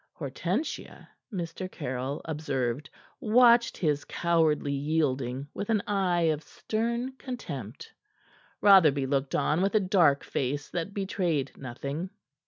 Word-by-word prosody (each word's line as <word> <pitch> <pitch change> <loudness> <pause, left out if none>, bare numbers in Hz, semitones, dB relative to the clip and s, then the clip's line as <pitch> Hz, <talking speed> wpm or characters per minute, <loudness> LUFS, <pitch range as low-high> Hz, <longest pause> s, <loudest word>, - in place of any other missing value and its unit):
Hortensia, 175 - -4 0.2
Mr. 185 0 -5
Caryll 130 -1 -4
observed, 140 -4 -2 0.3
watched 235 +1 +5
his 150 -4 0
cowardly 160 -4 +1
yielding 140 -3 -1
with 200 - -5
an 215 -3 +2
eye 190 -4 +1
of 155 -2 +1
stern 235 - -2
contempt. 275 - -7 0.7
Rotherby 160 -9 +6
looked 135 0 -1
on 155 +4 +1
with 195 +3 +1
a - - +6
dark 180 -7 +3
face 145 +2 -3
that 175 +3 -4
betrayed 180 -8 -1
nothing. 140 +7 -5
160 Hz, 115 wpm, -28 LUFS, 140-200 Hz, 0.7 s, Rotherby